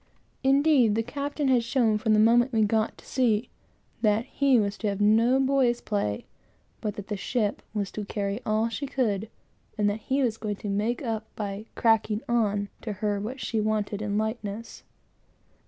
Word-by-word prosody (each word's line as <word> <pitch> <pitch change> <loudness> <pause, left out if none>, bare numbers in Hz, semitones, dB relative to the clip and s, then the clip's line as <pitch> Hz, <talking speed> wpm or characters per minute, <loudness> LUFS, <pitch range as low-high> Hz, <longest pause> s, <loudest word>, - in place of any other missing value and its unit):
Indeed, 270 -5 +4
the 225 - +1
captain 285 +3 -3
had 250 -3 +3
shown, 230 -3 +2
from 220 0 +2
the 215 - +4
moment 240 +4 +5
we 220 -1 +3
got 215 +1 +1
to - - -17
sea, 240 -3 +1 0.5
that 215 +1 +2
he 270 -2 +3
was 200 -1 0
to 215 - -1
have 200 -1 -1
no 225 +5 +4
boy's 265 -3 +2
play, 105 - -2 0.6
but 210 -1 -3
that 205 -3 -7
the 210 - -2
ship 210 +1 -1
had 210 - +1
got 195 - -5
to 210 - -4
carry 200 +1 -3
all 215 +1 +1
she 275 +5 -4
could, 220 -6 -1 0.5
and 210 -1 +2
that 210 - -4
he 270 +5 0
was 225 -3 0
going 210 -2 -3
to 205 - -6
make 215 +6 -1
up, 220 -2 -3
by 205 +1 -5
"cracking 220 -1 +2
on" 205 -4 +1
to 215 - -4
her, 205 0 -1
what 235 +6 -5
she 225 -3 -1
wanted 210 -1 -1
in 205 -1 -1
lightness. 220 0 -4
220 Hz, 190 wpm, -27 LUFS, 210-240 Hz, 0.6 s, moment